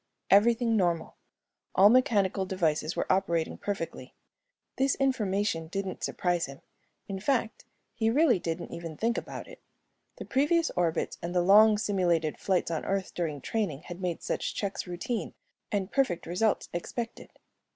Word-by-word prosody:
Everything 230 +3 +5
normal; 175 -5 0 0.6
all 195 - +8
mechanical 205 -5 +3
devices 165 -4 0
were - - -1
operating 170 -4 0
perfectly. 165 -10 -5 0.6
This 270 0 +2
information 205 - 0
didn't 190 +2 -4
surprise 175 -2 0
him, 135 0 -11 0.5
in 195 -1 -4
fact, 230 0 -1 0.3
he 225 -1 +1
really 270 - +4
didn't 165 0 -4
even 165 -2 -7
think 230 +1 +1
about - - -6
it. - - -13 0.5
The - - -8
previous 320 +5 +2
orbits 170 -2 -1
and 175 +1 -4
the 175 - +3
long 210 +3 +7
simulated 175 -7 0
flights 185 -3 0
on 160 - -2
Earth 195 -1 -2
during 155 -5 -3
training 180 - -2
had 175 +1 -8
made 180 -3 -3
such - - -2
checks 200 -2 -3
routine 180 +6 -4 0.4
and 200 -1 -1
perfect 260 -11 +1
results 195 +5 0
expected. 230 +7 -5
195 Hz, 145 wpm, -29 LUFS, 170-220 Hz, 0.6 s, all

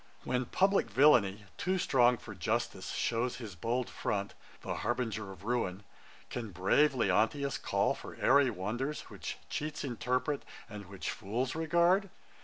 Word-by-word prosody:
When 125 0 0
publick 195 +9 +2
villainy, 110 -8 +4
too 185 +1 +1
strong 125 -8 +4
for 110 -1 -9
justice, 90 -4 -2
Shows 120 +1 0
his 110 -6 -7
bold 115 +8 -1
front, 100 -1 -2 0.3
the - - -4
harbinger 110 -5 -2
of 95 -1 -12
ruin, 105 -4 -1 0.5
Can 115 -3 -4
brave 100 - +3
Leontius 115 +6 +1
call - - +1
for - - -9
airy 140 -2 +4
wonders, 120 +8 -3
Which - - -6
cheats 150 0 -3
interpret, 125 +2 -1 0.3
and 105 -4 -9
which 95 -1 -4
fools 120 +6 -2
regard? 170 +5 +3
120 Hz, 140 wpm, -32 LUFS, 105-140 Hz, 0.5 s, villainy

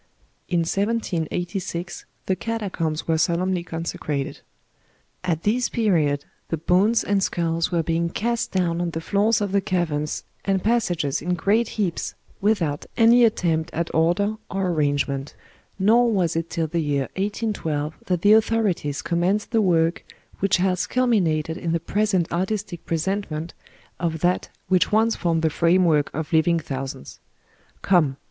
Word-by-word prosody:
In 175 -2 +2
1786 175 -2 -2 0.2
the 190 - +1
catacombs 185 -6 -3
were 160 -1 +2
solemnly 180 +2 +1
consecrated. 160 -4 -4 0.8
At 170 -3 -1
this 240 +4 +1
period 155 -10 +1 0.2
the 165 - -1
bones 190 +8 +3
and 200 -1 +1
skulls 170 -1 0
were 170 -2 +1
being 165 +1 0
cast 235 +6 -1
down 175 -2 0
on 175 - -1
the 160 - -4
floors 205 +6 +1
of 205 -2 -1
the 200 0 +2
caverns 160 -5 -1 0.2
and 195 -2 0
passages 175 - 0
in 180 +3 -1
great 210 +7 +2
heaps, 190 -6 -2 0.3
with 205 -2 +2
out 145 -1 -3
any 235 +1 +6
attempt 170 -7 +1
at 170 +1 -2
order 175 +7 +2
or 190 -1 -1
arrangement; 145 -3 -1 0.4
nor 230 +5 +4
was 180 -7 +1
it 165 0 -2
till 165 - -1
the 165 +2 -1
year 140 -3 0
18 210 +3 -1
12 150 -4 -3
that 180 -2 0
the 205 +1 +7
authorities 215 -10 +1
commenced 180 +6 0
the 225 -2 +3
work 170 -3 +2 0.4
which 195 -1 +2
has 180 0 0
culminated 180 -10 +1
in 165 -1 -2
the 170 - +1
present 195 +1 +1
artistic 190 0 -2
presentment 165 -1 -2 0.5
of 160 -3 -2
that 180 +1 +1 0.2
which 185 -1 +2
once 220 +2 +3
formed 165 -2 0
the 160 - +2
framework 170 -3 +3
of 160 +2 -5
living 165 +1 +4
thou 135 -1 -3
sands. 70 - -9 0.6
Come 155 -8 +3
175 Hz, 150 wpm, -23 LUFS, 160-205 Hz, 0.8 s, the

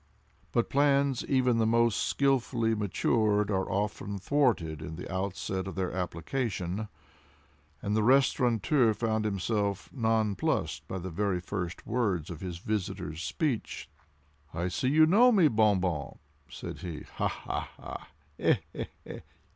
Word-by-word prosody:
But 120 - 0
plans 140 -2 +3
even 125 -3 +2
the 110 - +3
most 115 -1 +3
skilfully 125 -4 +1
matured 105 0 +1
are 95 -1 0
often 100 0 -2
thwarted 100 - +1
in 80 0 -6
the 90 - -7
outset 95 0 -2
of 95 - -6
their 95 -2 -1
application—and 95 - -2 1.1
the 110 - +3
restaurateur 125 -1 +3
found 110 -1 0
himself 100 0 -1
nonplussed 110 -5 0
by 95 - -4
the 95 0 -5
very 100 +1 0
first 90 -1 -5
words 100 -9 -1
of 80 - -8
his 90 -3 -5
visitor's 90 -5 -3
speech. 140 - -2 0.7
"I 85 +2 -1
see 130 +9 0
you 155 +3 +6
know 225 +10 +6
me, 190 -8 +5
Bon 110 -5 +3
Bon," 85 -6 -2 0.3
said - - -7
he; 85 -5 -6
"ha! - - -2
ha! - - -4 0.7
ha! - - -2
105 Hz, 130 wpm, -29 LUFS, 95-120 Hz, 1.1 s, you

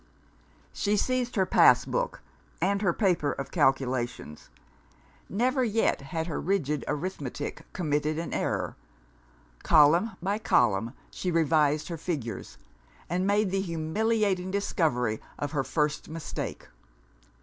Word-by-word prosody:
She 210 0 0
seized 250 +2 0
her 190 -3 +3
pass - - +5
book, - - -2 0.4
and 200 +1 +1
her 190 -4 +3
paper 175 -6 +1
of 135 - -6
calculations. 130 - 0 0.8
Never 255 +6 +1
yet 225 - +1
had 160 +4 -3
her 165 - -3
rigid 150 -6 0
arithmetic 145 -4 -4
committed 150 -2 -1
an 165 +1 -4
error. - - -1 0.9
Column 165 +8 +5
by 200 +4 -1
column 115 - +2 0.2
she 185 - -3
revised 155 -3 +2
her 170 - -4
figures 145 -8 -5 0.5
and 180 +2 +1
made 205 -1 +2
the 195 0 +1
humiliating 190 +3 0
discovery 150 - 0 0.2
of 145 - -3
her 145 -3 0
first 150 +4 -1
mistake. 160 0 -5
165 Hz, 120 wpm, -28 LUFS, 145-200 Hz, 0.9 s, pass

